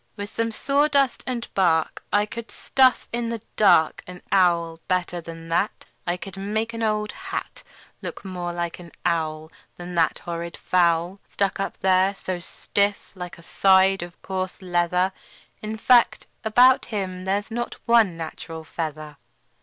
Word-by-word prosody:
"With 205 0 -6
some 230 0 -1
sawdust 280 +2 +2
and 245 -2 -3
bark 165 -4 +2
I 205 +2 +3
could 235 0 -7
stuff 260 -1 +2
in 235 -1 -1
the 230 -1 -3 0.2
dark 175 -7 +4
An 180 0 -10
owl 170 -3 +3
better 180 -1 -1
than 165 0 -9
that. 170 +5 0 0.2
I 175 +1 0
could 195 +1 -9
make 215 +4 -2
an 230 - -5
old 215 -1 0
hat 385 0 -6 0.4
Look - - -7
more 180 -2 -4
like 170 0 -3
an 170 -2 -12
owl 160 -2 -1 0.3
Than 175 0 -7
that 165 -2 +2
horrid 170 0 -5
fowl, 175 +1 +2
Stuck 200 -1 -1
up 195 - -3
there 190 +1 +3
so 185 -2 -4
stiff 200 +3 -1
like 180 -2 -8
a 170 - -15
side 190 +1 +4
of 175 0 -8
coarse 185 -1 -3
leather. 180 +1 +1 0.5
In 215 +1 -4
fact, 240 +1 +4 0.2
about 245 +4 +5
him 185 -4 -4
there's 200 +3 -1
not 240 +1 -3
one 225 -7 +4
natural 160 0 -7
feather." 155 -2 -5
185 Hz, 155 wpm, -24 LUFS, 170-215 Hz, 0.5 s, about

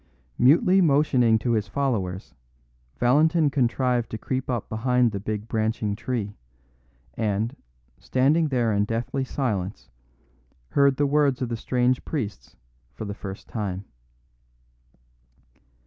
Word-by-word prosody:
Mutely 170 +9 +5
motioning 140 -7 +4
to 120 +2 -1
his 110 -3 0
followers, 100 -6 -2 0.6
Valentin 150 +5 +3
contrived 125 -2 +1
to 110 - -4
creep 130 +4 -3
up 120 -4 -2
behind 125 +1 +1
the 100 - -4
big 105 +1 -4
branching 110 -2 -1
tree, 110 -2 -3 0.8
and, 110 - -1 0.4
standing 150 +5 +2
there 120 -5 +1
in 100 0 +2
deathly 115 +5 -2
silence, 105 - -3 0.8
heard 140 - +3
the 145 - +2
words 140 -2 +2
of 125 - -3
the 120 - -2
strange 125 +2 0
priests 105 - -5 0.4
for - - -6
the 100 - -4
first 100 -1 -8
time. 100 -3 -4
120 Hz, 120 wpm, -25 LUFS, 105-135 Hz, 0.8 s, Mutely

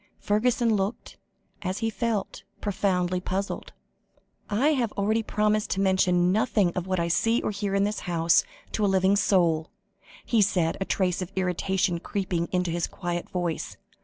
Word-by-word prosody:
Fergusson 230 +1 +2
looked, 200 +3 -3 0.4
as 185 0 -2
he 225 +1 -1
felt, 225 -3 -2 0.2
profoundly 185 -3 0
puzzled. 195 +2 -3 0.8
"I 230 +8 +2
have 250 -8 +1
already 215 +3 +1
promised 210 -1 0
to 195 - -1
mention 185 -2 +3
nothing 205 -3 +2
of 180 0 -3
what 185 -1 0
I 170 - 0
see 225 +7 +2
or - - 0
hear 200 -1 -2
in 200 - +3
this 210 +1 -1
house 170 -2 +2 0.3
to 215 - -1
a - - +4
living 190 0 +3
soul," 170 -5 +2 0.6
he 230 -3 +3
said, 180 -5 +2
a - - 0
trace 185 -2 0
of 185 +1 -5
irritation 185 -1 0
creeping 180 -3 -2
into 180 -2 0
his 170 0 -1
quiet 175 0 -4
voice. 175 -4 -3
190 Hz, 160 wpm, -26 LUFS, 180-210 Hz, 0.8 s, a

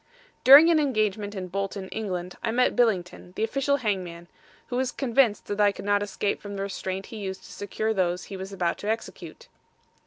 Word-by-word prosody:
During 290 +6 +9
an 320 - +4
engagement 215 -7 0
in 185 -1 -5
Bolton, 195 +1 -4
Eng., 180 -5 -4
I - - -1
met 250 +2 +2
Billington, 185 -6 0
the - - -1
official 275 +5 +1
hangman, 185 -7 -3 0.4
who 245 - -3
was 255 0 0
convinced 245 -4 +1
that 205 0 -2
I 205 -1 +5
could 200 - -9
not 205 0 +2
escape 205 0 -2
from 205 -1 -7
the 195 - -3
restraint 190 -1 -4
he 225 - -9
used 190 -2 -6
to - - -13
secure 215 +2 -2
those 180 -2 0
he 195 - -8
was 190 +1 -7
about 180 -3 -1
to 205 - -4
execute. 230 - -5
205 Hz, 195 wpm, -26 LUFS, 190-230 Hz, 0.4 s, During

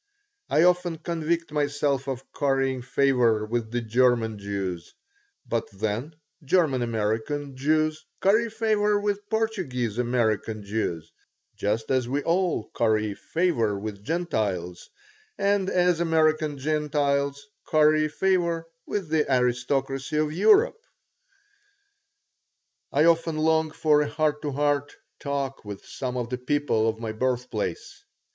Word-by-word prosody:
I 160 - +4
often 180 -1 +2
convict 165 0 -2
myself 145 -2 0
of 135 -1 -3
currying 135 -2 0
favor 125 -4 +2
with 115 0 -2
the 120 +1 -2
German 115 -2 +2
Jews. 100 -4 -4 0.5
But 115 -1 -2
then 110 +9 -3 0.3
German 145 -4 +2
American 115 +5 -2
Jews 155 +3 +1 0.2
curry 220 +4 +3
favor 215 -2 +1
with 205 0 -2
Portuguese 175 - -1
American 110 -3 0
Jews, 95 -6 -3 0.4
just 110 +3 -1
as 130 -2 +1
we 140 +2 -1
all 170 - 0
curry 110 -2 +1
favor 115 - 0
with 100 0 -6
Gentiles 105 - -2 0.5
and 200 -1 +1
as 180 -2 +2
American 155 -3 +2
Gentiles 140 -1 0 0.2
curry 155 -1 +4
favor 170 0 0 0.2
with 200 -5 -2
the 155 -3 +1
aristocracy 135 +3 0
of 155 0 +1
Europe 440 - +4 2.1
I 145 - +3
often 165 -1 +3
long 160 0 +2
for 150 -1 +3
a 150 - -1
heart 150 -1 0
to 150 - -3
heart 145 0 0 0.2
talk 140 -1 -3
with 100 -2 -8
some 125 -2 -4
of 120 -1 -3
the 125 - -2
people 125 -4 +1
of 110 - -3
my 115 -1 -4
birthplace. 120 -5 -3
140 Hz, 125 wpm, -26 LUFS, 115-160 Hz, 2.1 s, I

